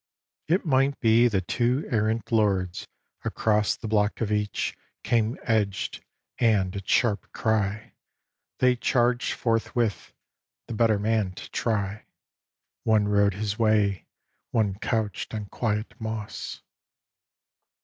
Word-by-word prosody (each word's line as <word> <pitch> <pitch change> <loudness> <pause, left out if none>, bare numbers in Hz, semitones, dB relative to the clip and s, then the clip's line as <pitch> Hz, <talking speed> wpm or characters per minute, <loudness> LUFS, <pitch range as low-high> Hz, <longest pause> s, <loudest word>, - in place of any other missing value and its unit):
XV 160 - +2
It 190 - -3
might 135 -1 +2
be 115 +1 +5
that 95 -6 -1
two 125 +4 +1
errant 110 0 0
lords 95 -5 +1 0.4
across 105 -1 +1
The 110 - -7
block 105 -1 +1
of 110 -2 -1
each 105 0 -1 0.3
came 115 0 +1
edged, 105 -4 -1 0.4
and 100 -6 +2
at 100 -1 -6
sharp 110 -4 +2
cry 110 -1 -1 0.6
They 125 -1 +3
charged 120 0 +1
forthwith, 115 -1 -1 0.5
the - - -6
better 110 -1 +3
man 105 -2 0
to - - -9
try. 105 -2 -2 0.8
One 110 -2 +3
rode 100 -1 +3
his 105 +2 -3
way, 105 -4 +2 0.4
one 110 -4 +1
couched 110 -2 -2
on 105 -1 -4
quiet 110 -2 -2
moss. 110 -1 -5
110 Hz, 120 wpm, -26 LUFS, 105-115 Hz, 0.8 s, be